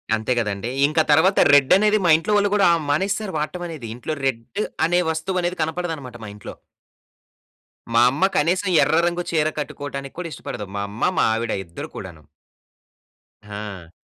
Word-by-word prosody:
అంతే 110 +3 -3
గదండీ! 105 0 -3 0.2
ఇంక 155 +2 0
తర్వాత 180 +6 +4 0.2
రెడ్డనేది 190 +10 +5
మా 170 - +4
ఇంట్లో 165 +6 -2
వాళ్ళు 205 0 +2
గూడా 200 - +4
ఆహ్, 165 -2 0
మానేసారు 195 +6 -1
వాడటమనేది. 155 -4 -5
ఇంట్లో 140 +6 -4
రెడ్ 115 -4 -1 0.4
అనే 175 +1 +2
వస్తువనేది 175 +2 -2
కనపడదన్నమాట 160 -6 -4
మా 105 - -7
ఇంట్లో. 105 - -9 1.4
మా 115 - +5
అమ్మ 160 +8 +1
కనీసం 180 +5 +1
ఎర్ర 160 - +2
రంగు 175 0 -2
చీర 155 -2 +2
కట్టుకోవడానికి 140 -1 -6
కూడా 170 - -4
ఇష్టపడదు. 105 - -7
మా 100 - -2
అమ్మ. 105 - 0
మా - - +4
ఆవిడ 115 0 -2
ఇద్దరు 85 0 -8
కూడాను. 85 -5 -9 1.2
ఆ! 100 -4 -8
155 Hz, 150 wpm, -22 LUFS, 115-175 Hz, 1.4 s, రెడ్డనేది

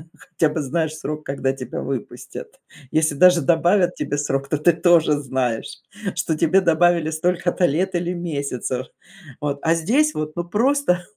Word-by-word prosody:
хотя 170 -2 -1
бы 160 - -1
знаешь 155 +3 -2
срок, 150 0 -6
когда 135 -1 -1
тебя 135 -1 -6
выпустят. 135 -4 -7 0.3
Если 155 -1 +1
даже 180 +3 +5
добавят 175 +4 +2
тебе 145 - -3
срок, 135 -1 -1
то 155 - 0
ты 155 +4 +4
тоже 165 -2 +4
знаешь, 130 -5 -2 0.5
что 160 -2 -1
тебе 170 +5 +3
добавили 170 -1 +3
столько-то 175 +2 0
лет 180 +5 0
или 175 +1 -1
месяцев. 140 -7 -3 0.6
Вот. 145 -1 -2
А 165 +1 +2
здесь 260 - +2
вот, 155 0 -4
ну, 175 - -2
просто, 215 -1 +1
160 Hz, 155 wpm, -21 LUFS, 145-175 Hz, 0.6 s, даже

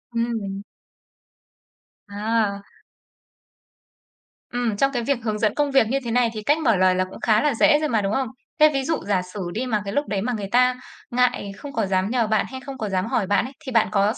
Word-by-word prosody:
Ừm. 220 -4 -2 1.5
À. 205 -1 -1 1.9
Ừm, 240 -4 -1
trong 275 +5 +2
cái 245 -3 -2
việc 280 +1 +1
hướng 215 -2 -2
dẫn 215 -1 +1
công 290 -1 +1
việc 270 -5 +4
như 265 - 0
thế 235 - -2
này 240 0 +3
thì 215 -1 -6
cách 295 +7 +3
mở 235 -8 +3
lời 185 0 +3
là 185 - +1
cũng 185 - -11
khá 215 -1 +3
là 295 -2 +2
dễ 295 +6 +4
rồi 305 - -1
mà, 225 -3 +2
đúng 195 +1 -1
không? 265 +2 0 0.3
Thế 305 - +7
ví 275 - 0
dụ 320 +3 -1
giả 195 -3 +2
sử 210 - -6
đi 245 +4 -2
mà 215 -4 0
cái 200 - -4
lúc 290 +4 0
đấy 200 -2 -1
mà 245 +4 -1
người 205 -3 -4
ta 250 +1 +4 0.4
ngại, 245 -5 +1
không 285 -1 -9
có 225 - 0
dám 190 +1 0
nhờ 240 -2 +1
bạn 215 -1 +1
hay 260 - -6
không 275 -1 -7
có 215 -4 -3
dám 185 -1 0
hỏi 220 -3 -1
bạn 205 +4 +2
ấy, 265 - -8
thì 260 - -5
bạn 225 -2 +3
có 205 +1 +2
s - - -12
225 Hz, 235 wpm, -23 LUFS, 205-255 Hz, 1.9 s, Thế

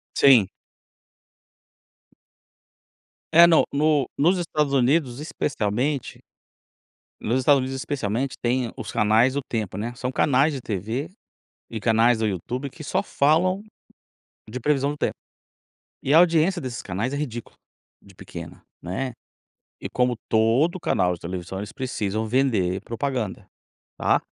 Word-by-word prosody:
Sim. 125 -8 +6 2.9
É 170 +2 +9
no 170 -2 +5
no 145 -2 +2
nos 175 +6 +3
Estados 155 -4 -1
Unidos 135 0 +2
especialmente 135 -2 -2 1.0
nos 120 +4 0
Estados 140 +2 +4
Unidos 130 +1 -3
especialmente 130 -2 -2
tem 120 0 0
os - - -6
canais 110 +5 +3
do 140 - -1
tempo 110 -7 -4
né, 115 +4 -4
são 125 +1 -3
canais 140 +3 +2
de 135 - -5
TV, 110 - -3 0.6
e 115 - -5
canais 115 +1 +3
do 110 - +1
YouTube 120 - -4
que 155 +4 -11
só - - 0
falam 180 +7 +2 0.9
de 125 +4 -5
previsão 140 +1 +1
do 145 - -4
tempo. - - -1 0.9
E 135 - 0
a 155 - +8
audiência 175 +1 +3
desses 125 -6 -5
canais 105 +8 -3
é - - -2
ridícula 120 -6 -5 0.5
de 100 - -18
pequena, - - -10 0.2
né. 110 +10 -3 0.7
E - - -5
como 125 -1 +1
todo 120 +11 +2
canal 90 - +1
de 85 - -8
televisão 90 +2 -6
eles 105 +1 -7
precisam 110 -5 -2
vender 105 -7 +1
propaganda, 120 -2 -3 0.5
tá. - - +2
125 Hz, 135 wpm, -24 LUFS, 110-145 Hz, 2.9 s, É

